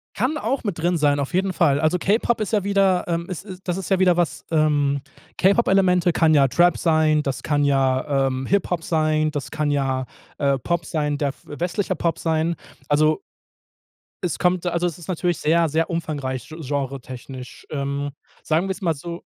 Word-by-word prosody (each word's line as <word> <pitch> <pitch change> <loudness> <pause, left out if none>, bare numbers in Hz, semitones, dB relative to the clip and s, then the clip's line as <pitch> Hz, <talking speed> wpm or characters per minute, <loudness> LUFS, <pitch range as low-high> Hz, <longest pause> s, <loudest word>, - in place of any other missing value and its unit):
Kann 255 +9 0
auch 270 -4 -2
mit 195 -6 -3
drin 175 +1 +1
sein, 145 -2 +2
auf 140 - -3
jeden 190 +1 +1
Fall. 145 -5 +2
Also, 160 +3 +2
K-Pop 220 +5 +1
ist 215 - -2
ja 205 -3 +2
wieder, 195 -2 +2
ähm 170 0 -2
ist 185 0 -6
ist 185 -2 -10
das 175 - 0
ist 190 -3 -5
ja 190 - +3
wieder 180 -2 +4
was, 175 -6 -1
ähm 145 -3 +2 0.4
K-Pop-Elemente 190 -3 +3
kann 160 -1 +3
ja 135 -2 +5
Trap 175 +6 +4
sein, 155 -2 +3
das 135 -3 -3
kann 145 -1 +1
ja, 135 0 +2
ähm, 130 0 -2
Hip-Hop 180 -4 0
sein, 155 -1 +1
das 145 -2 -5
kann 150 -1 -1
ja, 135 -2 0 0.3
äh, 140 -2 +2
Pop 170 +5 -1
sein, 150 -2 -1
der 140 -2 0
westlicher 175 +4 -2
Pop 165 -1 -1
sein. 160 0 0 0.3
Also 155 +1 +3 1.0
es 175 - -1
kommt 180 0 +1
also 175 0 0
es 170 -1 -4
ist 175 - -12
natürlich 175 -2 0
sehr, 165 +1 +2
sehr 160 +3 0
umfangreich 145 -7 -3
gen 160 +1 -9
genretechnisch. 130 -2 -6
Ähm, 140 0 -2 0.3
sagen 165 +4 +1
wir's 190 +1 -3
mal 170 -4 +1
so 170 +4 -7
160 Hz, 185 wpm, -22 LUFS, 145-180 Hz, 1.0 s, ja